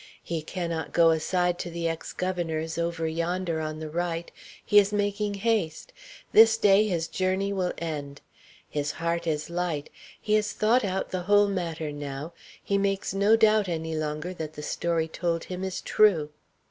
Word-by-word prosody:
He 165 -2 -3
cannot 170 0 -4
go 165 -1 +6
aside 175 +2 0
to 175 - -4
the 170 0 -2
ex 165 0 -4
governor's, 165 -3 -2
over 170 -1 -1
yonder 170 +1 -1
on 155 0 -4
the 155 0 -6
right. 170 0 -2 0.3
He 205 - +7
is 200 0 +2
making 205 0 -1
haste. 200 -6 -1 0.4
This 225 0 +7
day 205 0 +5
his 170 -4 -1
journey 190 +2 0
will 185 -2 0
end. 145 -4 -5 0.5
His 145 0 -2
heart 170 +1 -2
is 155 +1 -2
light; 170 -4 -2 0.3
he 210 - -1
has 215 0 +2
thought 230 +4 +3
out 190 -1 -2
the 185 - -2
whole 205 0 +5
matter 165 -5 -3
now; 145 +2 -6 0.3
he 200 0 +1
makes 195 -1 -1
no 200 +3 +4
doubt 215 -3 +4
any 160 -1 -3
longer 155 +3 -3
that 155 -3 -6
the 150 - -8
story 165 +1 -1
told 165 0 -2
him 185 0 -6
is 190 -1 -3
true. 170 -9 +3
170 Hz, 170 wpm, -27 LUFS, 160-195 Hz, 0.5 s, He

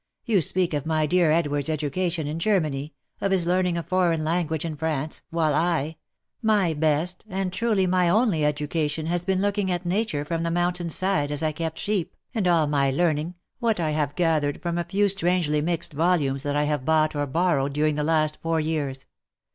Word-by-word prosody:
You 215 -7 +3
speak 175 +3 0
of 145 +1 -2
my 155 -1 +1
dear 175 +1 +3
Edward's 145 -3 +1
education 160 +2 -1
in 150 +3 -3
Germany 155 -7 0
— - - -42
of 195 - 0
his 185 -3 +4
learning 180 0 +1
a 170 - -2
foreign 175 -3 +1
language 160 -1 -1
in 160 -2 -4
France 155 -1 -2
— - - -53
while 155 -2 +2
I 160 -1 0 0.2
!— - - -55 0.2
my 180 -5 +1
best, 155 +4 0
and 190 -1 -2
truly 215 -3 +1
my 180 -1 +2
only 200 -5 +2
education 150 +1 -1
has 175 +1 -1
been 190 0 +1
looking 205 -1 0
at 175 0 -2
nature 175 -5 -1
from 165 +1 -2
the 170 - -1
mountain's 175 -1 -1
side 155 -7 0
as 145 +2 -1
I 155 - +1
kept 160 +1 -4
sheep, 200 -5 -2 0.2
and 215 -6 0
all 170 -3 +4
my 140 -2 +1
learning, 155 +3 0 0.2
what 230 -5 +1
I 160 -2 0
have 150 -2 -1
gathered 155 -5 +1
from 170 0 -1
a 170 - -2
few 200 +4 +2
strangely 175 -5 +1
mixed 170 +1 -2
volumes 145 -4 +1
that 145 0 -2
I 145 - +2
have 150 -3 -1
bought 155 +1 +2
or 145 0 -1
borrowed 140 -2 +1
during 150 +1 +1
the 150 0 -1
last 155 -1 +1
four 165 0 0
years. 150 -4 -2
165 Hz, 205 wpm, -25 LUFS, 150-180 Hz, 0.2 s, his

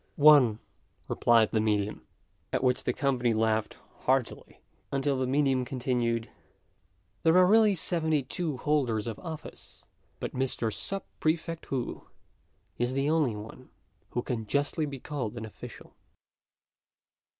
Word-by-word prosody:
"One," 145 -7 +6 0.5
replied 115 -2 +3
the 110 - +1
medium; 105 -1 -1 0.4
at - - -1
which 125 -1 +1
the - - +2
company 125 -3 0
laughed 110 0 0 0.2
heartily, 130 -2 -1 0.3
until 140 0 0
the 130 - 0
medium 135 -1 +2
continued, 120 -2 -1 0.9
"There 165 +2 +4
are 185 - +7
really 210 +1 +5
seventy 160 -4 0
two 150 +2 -3
holders 125 -7 0
of 115 -3 -5
office, 160 -3 -9 0.3
but - - -4
Mr. 125 -4 0
Sub 195 -1 -1 0.2
prefect 165 +1 -1
Wu 130 -3 -4 0.7
is 120 +1 0
the 135 +3 +1
only 150 -9 +2
one 105 +1 -10 0.4
who 120 - -2
can 115 -4 -3
justly 145 +4 0
be 140 -2 -7
called 125 -6 -4
an 115 - -5
official." 110 - -11
130 Hz, 130 wpm, -29 LUFS, 115-150 Hz, 0.9 s, are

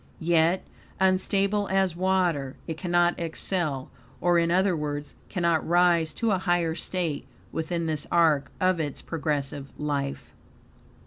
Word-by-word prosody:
Yet, 170 +2 +2 0.3
unstable 195 +2 +2
as 190 -3 +1
water, 175 -7 +1
it 160 - -4
cannot 175 0 +1
excel; 160 -4 -2 0.3
or, 175 -1 +3
in 170 0 +2
other 185 +1 +3
words, 145 -1 -4 0.2
cannot 170 -4 +1
rise 170 -2 +4
to 230 -2 +1
a 190 - +2
higher 175 -3 +1
state 170 -3 -3 0.2
within 165 +1 -2
this 155 -2 -2
are, 160 -5 +4
of 185 -1 +2
its 145 -3 -3
progressive 145 -3 -3
life. 140 -2 -3
170 Hz, 130 wpm, -26 LUFS, 150-185 Hz, 0.3 s, rise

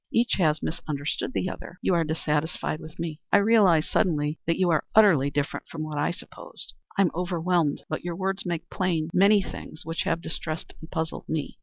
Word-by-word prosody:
Each 235 +1 +2
has 155 -3 +2
misunderstood 150 - -2
the - - 0
other. 185 - -7
You - - +3
are 170 -1 +3
dissatisfied 155 0 -1
with 160 -1 -11
me; 165 -2 -4
I - - +7
realize 200 -7 +5
suddenly 150 -3 +1
that 165 - +2
you 185 -2 +3
are 155 - +2
utterly 180 -11 +6
different 145 +1 -2
from 160 -1 -5
what 155 -1 -4
I 145 - +2
supposed. 175 - -8 0.2
I 200 - +6
am 175 - +2
overwhelmed, 175 -3 0
but 155 - -3
your 175 -1 -3
words 190 +1 -1
make 170 -2 -3
plain 170 -4 0
many 200 +2 +5
things 155 - -8
which 165 +1 -2
have 165 - +1
distressed 155 0 -5
and 160 - -10
puzzled 160 -2 -4
me." 155 -2 -3
165 Hz, 195 wpm, -26 LUFS, 155-185 Hz, 0.2 s, I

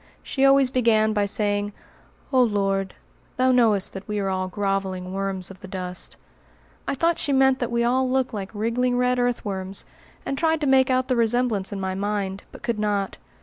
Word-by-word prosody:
She 270 - -1
always 275 -1 +5
began 220 -4 +3
by 205 -1 +1
saying, 205 0 0 0.6
"Oh 260 - +5
Lord, 195 -4 0 0.4
Thou 255 0 +4
knowest 225 -6 +3
that 190 0 -8
we 210 -1 -2
are 195 -1 -1
all 185 0 -1
groveling 190 -1 -2
worms 195 -1 -3
of 190 - -13
the - - -10
dust." 180 -1 -5 0.7
I - - 0
thought 335 +4 +1
she 285 - -1
meant 265 -1 +4
that 245 - -1
we 235 0 +1
all 255 +2 +2
looked 260 -1 0
like 200 -2 -4
wriggling 245 +4 0
red 250 0 +2
earthworms, 200 -6 -2 0.4
and 275 - -2
tried 320 -1 +2
to - - 0
make 265 -1 +4
out 255 0 +2
the 255 - +1
resemblance 230 -3 +1
in 200 - -4
my 190 -1 -2
mind, 200 0 -2
but - - -13
could 235 -3 -1
not. 205 -2 -1
215 Hz, 190 wpm, -24 LUFS, 195-255 Hz, 0.7 s, always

